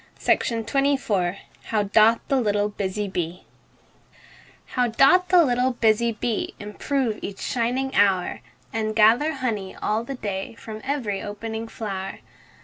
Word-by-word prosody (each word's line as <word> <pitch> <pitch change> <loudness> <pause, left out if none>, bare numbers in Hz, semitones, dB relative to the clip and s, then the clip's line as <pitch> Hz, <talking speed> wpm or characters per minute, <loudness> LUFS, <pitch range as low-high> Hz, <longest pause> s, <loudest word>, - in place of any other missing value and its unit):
UNKNOWN 230 -6 +1 0.3
HOW 215 -2 0
DOTH 220 +3 +4
THE 270 -2 +2
LITTLE 205 -2 +1
BUSY 205 0 -3
BEE 180 -2 -4 1.2
How 250 -1 0
doth 275 +11 +4
the 355 -2 +6
little 250 0 +1
busy 230 0 +2
bee 225 0 -3
Improve 220 +3 -2
each 195 - -6
shining 255 +3 -1
hour, 190 -3 +2 0.3
And 215 -1 -1
gather 230 +9 +5
honey 220 -8 -3
all 215 +2 -1
the 270 +3 -5
day 205 -2 -4
From 220 -1 -9
every 250 -8 -2
opening 220 +2 -5
flow'r! 195 -4 -5
220 Hz, 130 wpm, -24 LUFS, 205-250 Hz, 1.2 s, the